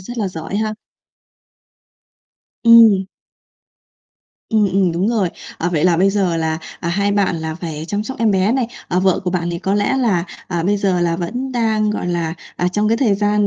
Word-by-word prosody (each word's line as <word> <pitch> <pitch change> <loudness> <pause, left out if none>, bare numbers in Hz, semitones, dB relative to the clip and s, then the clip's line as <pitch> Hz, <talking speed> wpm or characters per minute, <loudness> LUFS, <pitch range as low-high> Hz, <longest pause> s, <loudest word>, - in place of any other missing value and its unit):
rất 240 +6 -8
là 200 -3 0
giỏi 165 +3 -5
ha! 215 0 -1 1.9
Ừm. 225 -5 +7 1.4
Ừm, 215 -2 +3
ừm, 190 -3 +2
đúng 185 +6 0
rồi. 210 -6 +1 0.3
Ờ, 175 - 0
vậy 160 -1 0
là 175 -2 +4
bây 195 +3 +3
giờ 190 -4 0
là, 160 -1 -1 0.2
à, 170 - -3
hai 200 +3 0
bạn 195 -4 +1
là 160 0 -4
phải 160 -3 -6
chăm 205 +1 -1
sóc 265 - -6
em 225 -2 +2
bé 195 +3 +2
này, 260 -3 0 0.2
à, 180 - +1
vợ 185 -1 +2
của 180 - 0
bạn 175 -1 -1
thì 170 - -3
có 195 +2 -1
lẽ 205 +6 +1
là, 200 -9 +1 0.2
à, 170 -2 -1
bây 205 +3 +1
giờ 190 -3 0
là 170 -1 +1
vẫn 245 +10 -4
đang, 220 -3 +1
gọi 210 - -3
là, 170 -2 -2 0.2
à, 180 - +1
trong 210 +3 0
cái 230 - +2
thời 230 -6 +2
gian 205 0 +1
195 Hz, 205 wpm, -18 LUFS, 175-215 Hz, 1.9 s, Ừm